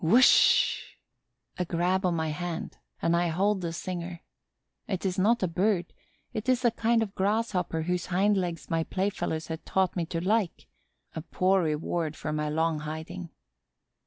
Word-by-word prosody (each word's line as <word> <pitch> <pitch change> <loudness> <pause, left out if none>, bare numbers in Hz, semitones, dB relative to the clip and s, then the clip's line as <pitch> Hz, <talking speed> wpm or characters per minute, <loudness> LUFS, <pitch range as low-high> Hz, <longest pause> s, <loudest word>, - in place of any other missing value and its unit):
Whoosh! 235 +11 +5 0.8
A - - +2
grab 180 +3 +1
of 175 - +1
my 160 -1 -1
hand 170 +2 -5 0.2
and 165 - +3
I 175 0 +2
hold 190 +4 +1
the 170 -1 -2
singer. 175 0 -5 0.7
It 190 -2 -3
is 185 0 0
not 225 +3 +3
a - - +3
Bird; 180 +2 0 0.4
it 220 +3 -3
is 255 0 +2
a 240 - +5
kind 230 0 +2
of 200 -3 -6
Grasshopper 195 -5 0
whose 180 +1 -1
hind 195 +3 +2
legs 175 -4 -2
my 165 -1 0
playfellows 185 -4 -2
have 160 0 -5
taught 190 -2 0
me 170 -3 -1
to 165 - -2
like; 200 +1 0 0.5
a 160 - -3
poor 185 +3 +2
reward 155 0 -1
for 155 - -4
my 150 0 -1
long 160 0 0
hiding. 160 +3 -6
180 Hz, 165 wpm, -28 LUFS, 165-195 Hz, 0.8 s, Whoosh